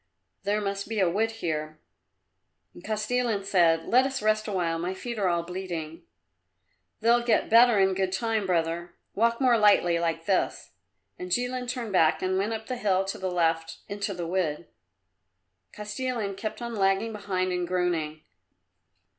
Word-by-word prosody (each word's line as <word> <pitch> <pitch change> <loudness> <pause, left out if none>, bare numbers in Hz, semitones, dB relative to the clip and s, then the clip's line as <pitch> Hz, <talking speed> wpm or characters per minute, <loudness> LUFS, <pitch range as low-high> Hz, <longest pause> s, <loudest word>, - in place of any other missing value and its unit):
There 205 +2 0
must 200 0 -3
be 220 -2 -2
a 190 - +4
wood 210 +6 +1
here." 155 -8 -4 0.9
And 175 - -14
Kostilin 220 0 -1
said, 170 -4 +3
"Let 255 +3 +4
us 265 -1 -3
rest 215 0 +1
a - - -3
while; 170 -4 -1
my 180 +3 -3
feet 235 +3 -5
are 195 - +2
all 170 -1 +1
bleeding." 170 -2 -6 1.0
"They'll 235 +1 +4
get 235 -2 +1
better 235 -1 +7
in 190 -1 +3
good 190 0 -1
time, 220 0 -1
brother. 170 0 -1 0.2
Walk 230 +2 +1
more 250 -4 +4
lightly 175 -5 +4
like 165 -1 -2
this." 190 0 -1 0.5
And 180 - -6
Jilin 245 +5 -1
turned 240 -4 -4
back 160 -2 +3
and 185 0 +1
went 205 +3 -1
up 220 0 -5
the 255 +1 -4
hill 195 -4 +1
to 195 - -5
the 190 - -2
left 165 -2 0
into 200 -1 -3
the 175 -1 -4
wood. 170 -3 -1 1.1
Kostilin 210 -1 -4
kept 215 +4 -5
on 235 0 -4
lagging 195 +2 +1
behind 185 -3 -2
and 180 -1 -1
groaning. 170 -4 -1
195 Hz, 165 wpm, -27 LUFS, 175-220 Hz, 1.1 s, better